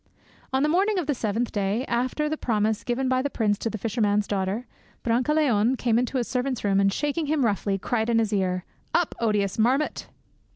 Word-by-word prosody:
On 265 +1 +1
the - - +3
morning 390 +5 +2
of 355 - 0
the 290 - +1
seventh 230 -1 -1
day, 205 +5 -1
after 255 +5 -1
the 310 - -1
promise 220 -5 0
given 260 +1 -1
by 255 0 +2
the 285 - -1
prince 210 -5 0
to 225 - -2
the 220 - -4
fisherman's 210 -1 +1
daughter, 200 +4 -2 0.4
Brancaleone 250 -1 +2
came 235 -2 +2
into 250 +2 -1
his 240 - -1
servant's 255 0 -2
room, 195 -1 +2
and, 195 0 +3
shaking 295 +7 -1
hint 300 -2 +1
roughly, 200 -3 0
cried 220 +3 -1
in 230 - +3
his 220 -2 +1
ear, 185 -2 0 0.3
"Up, 350 - +2
odious 210 -3 0
marmot!" 260 +7 +1
235 Hz, 200 wpm, -25 LUFS, 205-265 Hz, 0.4 s, the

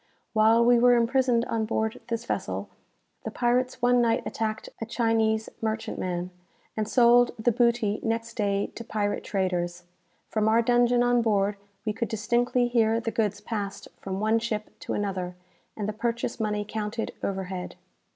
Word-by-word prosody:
While 225 +2 +5
we 240 0 +5
were 245 0 +6
imprisoned 240 0 +2
on 225 -1 -1
board 220 0 -2
this 230 0 -3
vessel, - - -3 0.5
the - - -3
pirates 250 +1 0
one 245 0 +5
night 230 -1 +2
attacked 220 -1 -3
a - - -1
Chinese 225 -2 +1
merchantman, 215 -5 -3 0.4
and 215 -1 -1
sold 240 0 +5
the 230 +2 +2
booty 235 -3 +2
next 230 0 -2
day 200 -3 0
to 235 - -7
pirate 210 -2 -2
traders. 180 -3 -2 0.4
From 215 -1 0
our 225 +2 +4
dungeon 240 0 +3
on 245 0 +3
board 205 -2 +1 0.3
we 215 - 0
could 235 +2 -2
distinctly 240 +3 +1
hear 225 -2 +2
the 225 0 -3
goods 210 -2 -1
passed 205 -2 -5
from 190 0 -4
one 220 +2 +2
ship 215 -2 -3
to - - -4
another, 185 -3 -3 0.4
and 210 -2 -2
the 215 - -2
purchase 235 +1 -2
money 210 -1 -1
counted 220 +1 -3
overhead." 190 -2 -4
225 Hz, 160 wpm, -27 LUFS, 210-235 Hz, 0.5 s, were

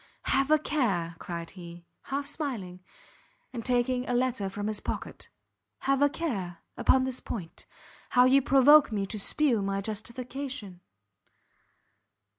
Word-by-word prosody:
"Have 270 +1 +1
a 310 - +6
care," 205 - -1
cried 170 -1 -6
he, 170 -2 -11 0.2
half 280 +1 -2
smiling, 245 - -4 0.7
and 235 -2 -5
taking 250 +1 0
a 245 - +1
letter 245 -5 0
from 205 +1 -5
his 215 -1 -1
pocket, - - -6 0.5
"have 275 0 +1
a 285 - +5
care, 200 - -3 0.2
upon 260 - +3
this 260 -1 -2
point, 175 -8 -7 0.4
how 250 0 +5
you 270 +2 +5
provoke 275 +2 +6
me 200 -2 -1
to 210 +2 -5
spew 245 +1 +1
my 195 0 -1
justification!" 235 -1 -6
245 Hz, 135 wpm, -28 LUFS, 195-270 Hz, 0.7 s, a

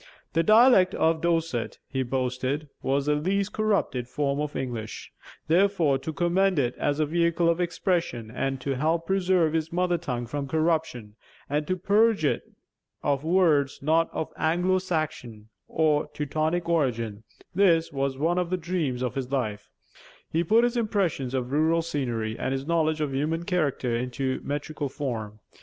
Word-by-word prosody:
The 165 - +3
dialect 215 -1 +6
of 160 0 +2
Dorset, 165 -8 -1
he 130 - -2
boasted, 130 +3 -2
was 135 +1 0
the 150 - +2
least 195 +7 0
corrupted 200 - 0
form 140 +1 -1
of 150 0 -3
English; 115 -4 -5 0.3
therefore 170 -5 +3
to 160 - -5
commend 175 +3 +1
it 125 -3 +1
as 145 +1 0
a 155 - +3
vehicle 170 +2 +1
of 170 +1 +2
expression 170 - -1
and 135 +2 -2
to 135 +1 -2
help 160 +5 0
preserve 185 -4 +2
his 160 0 -1
mother 175 0 +1
tongue 125 -7 -3
from 140 +3 -4
corruption, 155 -9 -1 0.3
and 150 +1 -1
to 185 - 0
purge 210 -1 +3
it - - -1 0.5
of 140 -1 0
words 160 -5 +3
not 160 +3 +3
of 160 - -4
Anglo 180 +4 +2
Saxon 145 - -4 0.2
or 155 -2 +1
Teutonic 155 +4 -1
origin, 115 -10 0 0.3
this 170 -4 +3
was 135 -1 -1
one 170 +5 +1
of 180 -1 -1
the 185 - 0
dreams 160 -8 -2
of 125 - -2
his 130 -2 -4
life, 110 -7 -2 0.6
he 165 +2 +1
put 220 +7 +4
his 240 0 +1
impressions 190 - 0
of 125 -1 -2
rural 160 +3 +2
scenery 120 -8 -2
and 130 - -1
his 135 0 -3
knowledge 160 -1 +1
of 145 -3 -1
human 155 +5 -1
character 145 -9 0
into 125 +2 -2
metrical 145 0 -3
form. 110 -7 -5
155 Hz, 160 wpm, -26 LUFS, 135-170 Hz, 0.6 s, dialect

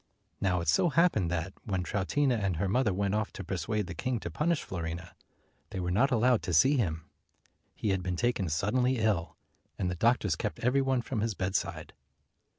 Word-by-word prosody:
Now 90 -2 +1
it 85 - -5
so 80 - +4
happened 150 - +3
that, 90 +2 -2
when 95 -3 -2
Troutina 125 +9 +1
and 100 -4 0
her 95 +4 0
mother 115 +2 +2
went 100 +1 0
off 110 0 -1
to - - -6
persuade 95 +4 -2
the 85 - -6
king 120 +8 -2
to - - -5
punish 165 +1 0
Fiorina, 85 -1 -5 0.6
they 95 - -5
were 90 -1 -1
not 125 +9 +3
allowed 125 -1 +3
to 90 - -1
see 135 - +5
him. 85 - -1 0.7
He 110 - -2
had 95 -1 +1
been 90 0 -2
taken 120 -2 0
suddenly 125 - +1
ill, 105 -7 0 0.4
and 90 - -1
the - - -3
doctors 110 -3 +2
kept 105 +5 -3
every 125 +3 +3
one 130 -2 +1
from 115 -4 -2
his 110 -2 -1
bedside. 95 +1 -2
100 Hz, 195 wpm, -30 LUFS, 90-125 Hz, 0.7 s, see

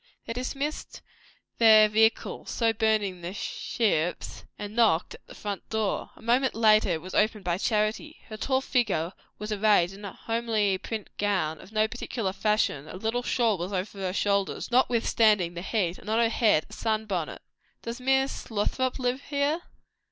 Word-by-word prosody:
They 230 - -4
dismissed 275 +5 -4 0.6
their 215 -2 +8
vehicle, 220 +1 +1
so 230 -1 +1
burning 215 -4 0
their 175 +3 -6
ships, 180 -7 -2
and 205 +1 -7
knocked 215 -8 +3
at - - -15
the - - -12
front 200 -3 -6
door. 220 -2 -1
A - - -17
moment 250 +3 +2
after 215 -2 +4
it 165 -2 -1
was 185 - -8
opened 215 -1 +1
by 175 0 -1
Charity. 215 +9 -1
Her 215 - -7
tall 260 +4 0
figure 210 - 0 0.2
was 210 +1 -6
arrayed 205 -4 +3
in 200 +2 -12
a 200 - -5
homely 225 -4 0
print 215 0 -6
gown, 185 -7 0
of 195 - -15
no 215 0 +2
particular 220 -3 -4
fashion; 195 -8 0
a 165 - -8
little 225 +5 -1
shawl 230 -5 +1
was 180 +4 -4
over 195 +2 -3
her 185 -1 -2
shoulders, 200 +3 -1
notwithstanding 225 -7 +3
the 170 - -6
heat, 190 -3 -1
and 210 - -10
on 220 - +2
her 230 -1 +3
head 215 -9 +3
a - - -14
sun 220 -1 -1
bonnet. 180 -7 -4 0.4
"Does 235 +2 -6
Miss 265 +1 0
Lothrop 245 +4 -1
live 255 0 -1
here?" 290 +3 0
215 Hz, 175 wpm, -27 LUFS, 195-235 Hz, 0.6 s, their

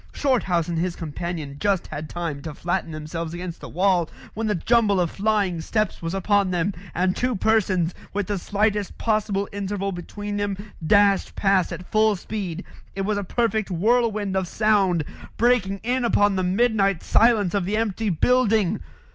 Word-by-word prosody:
Shorthouse 190 - +1
and 170 -2 -1
his 175 0 -1
companion 160 -2 -5
just 200 -3 +1
had 150 +1 -6
time 165 -5 -4
to 155 -1 -7
flatten 175 0 -2
themselves 160 +2 -5
against 175 -1 -6
the - - -8
wall 180 -1 +2 0.2
when 225 +1 -2
the 210 - +1
jumble 210 +1 +3
of 175 -2 +1
flying 200 -5 0
steps 215 +4 -1
was 165 +2 -3
upon 200 0 +2
them, 180 +2 0 0.2
and 185 +1 +1
two 250 -1 0
persons, 185 -5 +1 0.2
with 205 0 -1
the 200 0 -2
slightest 205 +1 0
possible 210 -3 0
interval 200 0 -3
between 205 +3 -5
them, 205 -1 -1 0.3
dashed 200 +3 +3
past 195 -3 +2
at 180 - -8
full 215 0 +4
speed. 190 -3 -5 0.3
It 195 - -2
was 205 +1 0
a - - -3
perfect 220 +1 0
whirlwind 210 +1 +1
of 190 -1 0
sound 195 -5 +2 0.3
breaking 220 -5 +2
in 250 +2 0
upon 205 -4 +3
the 190 - 0
midnight 195 -1 +2
silence 220 -6 +3
of 200 -3 0
the 205 +3 0
empty 220 -1 -1
building. 220 +1 +2
195 Hz, 170 wpm, -23 LUFS, 175-215 Hz, 0.3 s, full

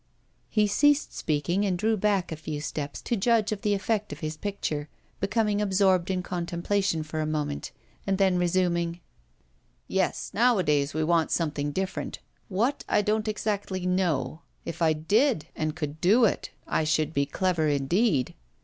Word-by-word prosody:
He 215 -1 +3
ceased 290 +8 +3
speaking 160 +6 0
and 190 -3 0
drew 220 +4 +2
back 200 -3 +1
a - - -2
few 155 -1 -5
steps 145 -1 -5
to 235 - 0
judge 225 0 +2
of 210 -2 -3
the 205 -1 +2
effect 210 0 -1
of 150 +3 -8
his 155 0 -3
picture, 155 -5 -3 0.3
becoming 210 0 +1
absorbed 190 -3 +2
in 185 -1 -1
contemplation 175 0 -1
for 155 0 -4
a 155 - -1
moment, 150 -2 -3 0.4
and 195 -1 +1
then 190 -2 +3
resuming: 175 -1 +1 0.9
'Yes, - - -1
nowadays 160 - +2
we 155 - +1
want 165 0 +2
something 145 -3 -1
different 190 +5 -3 0.3
what, 230 +9 0
I 210 - +3
don't 215 +1 0
exactly 205 -3 -2
know. 165 -6 0 0.2
If 165 - -6
I 160 -1 +4
did, 205 - +2
and 155 0 -2
could 150 -2 -5
do 220 +7 +5
it, 210 - 0 0.2
I - - 0
should 155 0 +1
be 140 -1 +1
clever 170 0 0
indeed. 145 - +1
180 Hz, 160 wpm, -27 LUFS, 155-205 Hz, 0.9 s, do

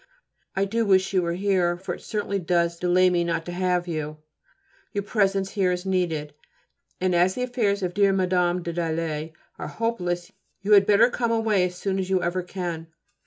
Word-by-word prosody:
I 195 +1 +2
do 230 +4 0
wish 195 -2 +3
you 185 - +3
were 170 -1 -1
here, 185 -2 +1
for 185 - -5
it - - -9
certainly 205 -2 -2
does 170 -1 0
delay 180 +1 +4
me 175 -1 +2
not 165 -1 -2
to 175 - -5
have 180 0 0
you. 155 -2 -4 0.8
Your 200 -1 -1
presence 195 -2 +1
here 190 -3 +1
is 180 +1 -3
needed, 165 -6 -1 0.7
and 185 0 +1
as 180 +2 +3
the 250 - -2
affairs 215 -6 0
of 180 -1 -2
dear 200 0 +4
Mme. 180 -2 +1
de 170 0 -4
Dalet 160 -2 -2 0.3
are - - -4
hopeless 175 -7 -2 0.3
you 205 - -1
had 200 -1 +7
better 220 +4 +5
come 235 -1 -1
away 220 -5 +2
as 180 0 -4
soon 190 +1 -2
as 190 0 -3
ever 185 -1 +1
you 180 - -5
can. 175 -3 -4
185 Hz, 195 wpm, -25 LUFS, 175-200 Hz, 0.8 s, had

